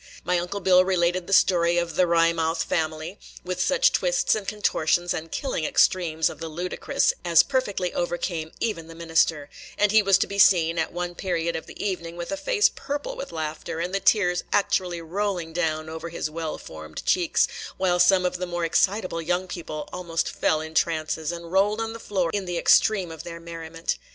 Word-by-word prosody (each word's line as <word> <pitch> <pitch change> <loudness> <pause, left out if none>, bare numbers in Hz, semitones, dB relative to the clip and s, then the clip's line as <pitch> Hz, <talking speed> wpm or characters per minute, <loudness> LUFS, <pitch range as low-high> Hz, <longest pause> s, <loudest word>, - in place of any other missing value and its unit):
My 180 0 +1
Uncle 200 +4 -4
Bill 185 0 +5
related 180 -1 0
the - - -7
story 175 -3 +4
of 170 -1 -1
"the 180 +3 +3
Wry 165 0 +3
mouth 165 0 0
Family," 160 +3 -3 0.2
with 180 0 -3
such - - +3
twists - - +1
and 210 -3 -3
contortions 175 -4 +1
and 160 0 -6
killing 265 - -2
extremes 160 0 +2
of - - -6
the 165 0 -5
ludicrous 175 +3 0
as 170 -1 +5
perfectly 205 -10 -1
overcame 175 -2 -2
even 170 -8 -2
the 165 - -11
minister; 165 -3 +1 0.3
and 210 -1 +3
he 220 0 +6
was 195 -2 +4
to - - +1
be 200 0 -5
seen, 170 -4 +5
at 160 - -1
one 175 0 -4
period 170 -2 -2
of 160 - -5
the - - -12
evening, 170 -4 -3
with 170 0 -5
a - - 0
face 425 +7 +2
purple 290 - -4
with - - -7
laughter, 160 0 -4
and 175 +2 -3
the 195 - +1
tears 180 -4 +2
actually 180 -4 0
rolling 180 -1 -3
down 155 -2 -1
over 160 +1 -6
his 160 -2 -4
well 160 -1 -4
formed 80 0 -9
cheeks, 175 -3 +2 0.3
while 180 -2 +1
some 180 +1 +5
of 180 - -1
the 180 0 -4
more 175 -1 -2
excitable 185 0 +1
young 175 +3 -1
people 155 -4 -6
almost 170 -2 -2
fell 155 - 0
in 160 0 -8
trances, 160 -1 0
and 170 -1 -8
rolled 205 +3 +2
on 225 0 -3
the 230 - -8
floor 185 -6 -1
in 200 -2 -1
the 175 -1 -3
extreme 190 -1 +3
of 160 - -8
their 170 -1 -8
merriment. 165 0 -5
175 Hz, 200 wpm, -25 LUFS, 165-190 Hz, 0.3 s, he